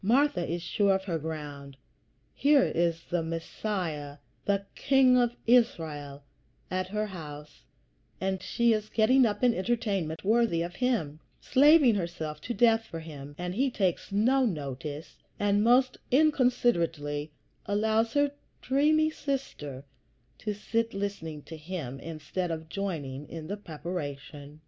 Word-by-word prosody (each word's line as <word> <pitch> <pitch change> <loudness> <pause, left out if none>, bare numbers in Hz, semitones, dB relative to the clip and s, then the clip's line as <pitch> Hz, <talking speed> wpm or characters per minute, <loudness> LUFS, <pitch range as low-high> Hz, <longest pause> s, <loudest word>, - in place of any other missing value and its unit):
Martha 240 -3 +3
is 170 +1 -2
sure 195 +2 +2
of 190 - -2
her 170 -4 -2
ground. 145 -3 -7 0.6
Here 285 -1 +4
is 165 -1 0
the 175 -1 +1
Messiah, 165 -3 -4 0.3
the 200 -1 +1
King 265 -2 +4
of 240 -1 +2
Israel, 155 - +1 0.5
at 185 0 -1
her 210 +2 -1
house, 150 -6 -9 0.6
and 190 0 -1
she 235 -1 +2
is 215 0 -2
getting 240 +3 +4
up 205 +2 -3
an 245 -1 +5
entertainment 195 -7 -1
worthy 215 -5 +2
of 175 +1 -7
him, 180 - 0 0.2
slaving 290 -2 +6
herself 170 -5 -4
to 240 - -4
death 225 -2 +4
for 165 -6 -7
him, 145 -3 -9
and 180 0 -3
he 265 +7 +1
takes 190 -8 -1
no 250 +7 +3
notice, 150 - -4 0.2
and 205 0 +2
most 250 +2 +4
inconsiderately 240 - +2 0.4
allows 220 +2 +1
her 285 -1 +3 0.3
dreamy 310 +4 +3
sister 205 - -4 0.6
to 210 -1 -3
sit 230 +2 -1
listening 165 -7 -4
to 165 - -9
him, 155 -5 -6
instead 165 +3 -4
of 160 -1 -5
joining 150 -9 -4
in 160 -2 -7
the 200 +6 -4
preparation. 150 -5 -7
190 Hz, 135 wpm, -29 LUFS, 155-235 Hz, 0.6 s, slaving